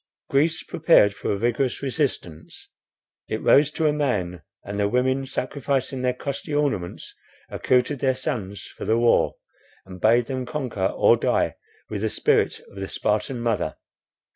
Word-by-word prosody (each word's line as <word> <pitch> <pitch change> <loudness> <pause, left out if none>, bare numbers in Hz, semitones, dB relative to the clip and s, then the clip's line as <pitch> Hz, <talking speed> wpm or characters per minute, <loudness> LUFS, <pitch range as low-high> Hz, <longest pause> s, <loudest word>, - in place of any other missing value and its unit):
Greece 155 +4 +2
prepared 160 - +4
for - - -3
a 100 - 0
vigorous 120 +5 0
resistance; 130 - -4 0.6
it - - -2
rose 145 +1 +5
to 160 - -1
a 150 - +3
man; 100 - -1 0.2
and 100 +1 -4
the 100 0 +2
women, 130 +3 +1
sacrificing 130 0 -2
their 125 0 0
costly 140 +3 -4
ornaments, 135 -12 -2 0.4
accoutred 125 +2 +1
their 130 -1 +1
sons 100 -6 -4
for - - -10
the 110 - +2
war, 120 0 +3 0.5
and 90 -1 -11
bade 115 +2 +4
them 130 -1 -4
conquer 125 -11 -2
or - - +4
die - - +1 0.3
with 105 -2 -4
the 110 - 0
spirit - - +1
of 100 - -18
the 95 - -4
Spartan 110 +6 -1
mother. 115 -6 -1
125 Hz, 155 wpm, -24 LUFS, 105-140 Hz, 0.6 s, rose